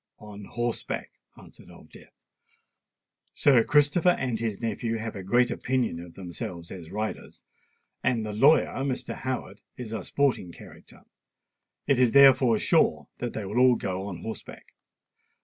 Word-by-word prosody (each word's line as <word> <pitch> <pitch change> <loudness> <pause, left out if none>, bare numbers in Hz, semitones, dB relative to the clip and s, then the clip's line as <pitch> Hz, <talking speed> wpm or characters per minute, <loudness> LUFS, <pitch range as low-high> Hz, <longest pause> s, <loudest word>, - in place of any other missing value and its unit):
"On 105 -1 -11
horseback," 120 +1 -4 0.3
answered - - -16
Old - - -16
Death. - - -17 1.2
"Sir 130 -5 +4
Christopher 150 +6 +3
and 125 -4 -2
his 110 -3 -3
nephew 115 0 -2
have 110 0 -5
a 100 - -6
great 120 +6 +2
opinion 125 -10 -1
of 85 -1 -11
themselves 90 -1 -7
as 85 -4 -9
riders; 110 +3 -5 0.6
and 115 -3 0
the 105 - -5
lawyer, 140 +9 +4
Mr. 135 -2 -3
Howard, 120 -6 -5 0.2
is 115 -3 -7
a 110 -4 -4
sporting 135 -10 0
character. - - -15 0.8
It 135 -3 +2
is, 125 -3 +3
therefore, 130 -4 +6
sure - - +1
that 120 -1 -4
they 110 - -5
will 105 +5 -1
all 125 -1 +6
go 95 -1 -4
on 90 -4 -7
horseback." 110 - -9
115 Hz, 150 wpm, -26 LUFS, 100-130 Hz, 1.2 s, therefore